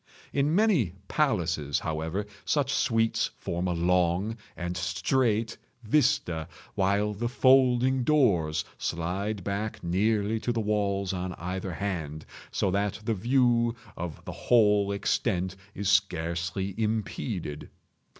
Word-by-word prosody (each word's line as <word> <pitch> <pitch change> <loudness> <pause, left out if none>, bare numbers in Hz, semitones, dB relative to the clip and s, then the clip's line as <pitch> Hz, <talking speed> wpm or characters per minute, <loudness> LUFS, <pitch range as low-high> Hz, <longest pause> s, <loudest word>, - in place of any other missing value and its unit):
In 145 +3 +2
many 180 - +3
palaces, 85 - +1
however, 80 +5 -2 0.2
such 145 -2 +1
suites 115 -3 +1
form 85 +2 -2
a 90 - 0
long 90 +4 +1 0.2
and 90 0 -3
straight 110 +4 0 0.3
vista, 90 - +1 0.3
while 100 +2 +1
the 120 +4 -2
folding 130 0 +4
doors 100 - +2
slide 95 +4 -2
back 105 +2 -3
nearly 105 +4 +1
to 120 - -1
the 115 - -1
walls 100 -3 0
on 90 0 -3
either 90 +2 -4
hand, 80 -5 -4 0.2
so 95 - 0
that 100 +2 -1
the 115 - +1
view 120 +1 +2 0.2
of 85 -3 -6
the - - -5
whole 105 -4 +3
extent 95 -2 0 0.2
is 100 0 -3
scarcely 90 -1 0
impeded. 105 - -3
100 Hz, 120 wpm, -28 LUFS, 90-115 Hz, 0.3 s, folding